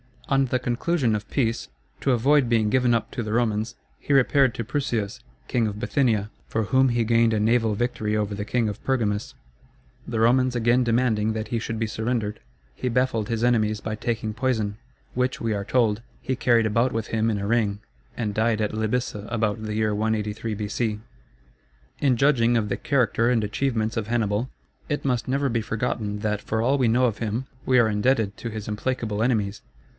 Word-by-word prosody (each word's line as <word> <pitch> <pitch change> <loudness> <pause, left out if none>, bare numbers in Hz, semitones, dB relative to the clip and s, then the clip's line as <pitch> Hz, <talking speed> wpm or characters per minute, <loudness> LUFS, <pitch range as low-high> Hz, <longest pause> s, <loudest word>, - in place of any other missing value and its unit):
On 135 0 +3
the 130 0 0
conclusion 125 +1 0
of 105 -1 -3
peace, 115 -5 0 0.3
to 135 - +1
avoid 135 +3 +3
being 115 -2 +2
given 125 0 +3
up 115 - -2
to - - -3
the 110 -1 -3
Romans, 110 -1 0 0.2
he 145 - -1
repaired 135 -1 +4
to 115 - -3
Prusias, 120 -4 -2 0.3
king 115 -3 +1
of 105 -1 -4
Bithynia, 110 -3 +1 0.2
for 110 - -1
whom 130 +5 +3
he 120 -1 +1
gained 115 0 +3
a 110 - +1
naval 110 0 +2
victory 110 -2 -1
over 105 -1 -1
the 100 0 -4
king 120 0 0
of 105 - -7
Pergamus. 110 -6 -1 0.7
The 115 -2 -1
Romans 125 +2 +3
again 120 +2 +3
demanding 115 -2 +1
that 110 0 -4
he 115 - -1
should 115 0 -4
be 115 - 0
surrendered, 110 -1 -2 0.3
he 130 - -4
baffled 120 -3 +1
his 115 -1 -2
enemies 110 -3 +2
by 110 - -3
taking 110 0 -2
poison, 110 -4 -1 0.4
which, 125 +1 -1
we 115 -1 0
are 100 -1 -3
told, 115 -3 +2 0.2
he 130 - -1
carried 120 -3 +3
about 115 +4 +1
with 110 -1 -2
him 115 0 0
in 105 - 0
a 100 - -3
ring, 105 -2 +1 0.4
and 105 -3 -2
died 110 +1 +1
at 105 - -1
Lybyssa 110 -1 -2
about 110 -2 -1
the 105 -1 -4
year 110 -1 +1
183 110 +1 -1
B.C. 105 +1 -2 1.0
In 135 -3 +3
judging 120 -3 +3
of 110 -3 +1
the - - -1
character 120 -4 +1
and 115 -3 +2
achievements 110 +1 -1
of 110 -2 -2
Hannibal, 115 +1 0 0.4
it 145 -1 -2
must 125 -4 0
never 140 +1 +1
be 115 -1 0
forgotten, 110 -2 -2
that 105 -1 -1
for 110 0 -1
all 135 +5 +2
we 130 -3 +2
know 120 +3 +3
of 110 -4 0
him, 115 +3 -2 0.2
we 130 - +4
are 115 -3 +5
indebted 105 -1 +1
to 115 - -5
his 110 -2 -6
implacable 110 -1 -2
enemies. 110 -4 0
115 Hz, 195 wpm, -24 LUFS, 105-125 Hz, 1.0 s, are